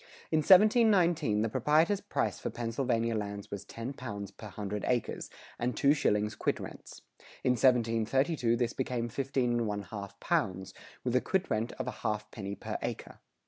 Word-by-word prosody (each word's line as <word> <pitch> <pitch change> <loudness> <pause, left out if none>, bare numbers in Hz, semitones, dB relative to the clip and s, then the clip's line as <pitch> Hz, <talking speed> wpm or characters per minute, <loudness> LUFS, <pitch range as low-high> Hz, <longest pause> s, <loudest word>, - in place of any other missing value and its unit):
[100:4] - - -22 0.2
In 160 - +3
1719 185 - +5
the - - +1
proprietor's 155 - +2
price - - -1
for - - -3
Pennsylvania 115 -1 -1
lands 100 -1 -4
was 100 -1 -5
ten 115 +6 -6
pounds 100 -6 -6
per 105 +2 -10
hundred 105 +1 -5
acres, 120 -3 -1 0.3
and 125 +1 -1
two 140 0 +5
shillings 105 -7 +1
quit - - -1
rents. - - -10 0.4
In 130 - +3
1732 120 +2 +2
this 120 -1 0
became 125 -2 -2
fifteen 130 0 0
and 120 -1 +1
one 105 -1 -2
half 100 -1 -8
pounds, 95 -1 -1 0.3
with 125 -1 0
a 125 - +4
quit 190 0 -1
rent 110 +2 0
of 130 - -4
a 125 - -2
half 105 0 -2
penny 100 -2 -5
per - - -5
acre. - - -5
115 Hz, 175 wpm, -31 LUFS, 105-135 Hz, 0.4 s, 1719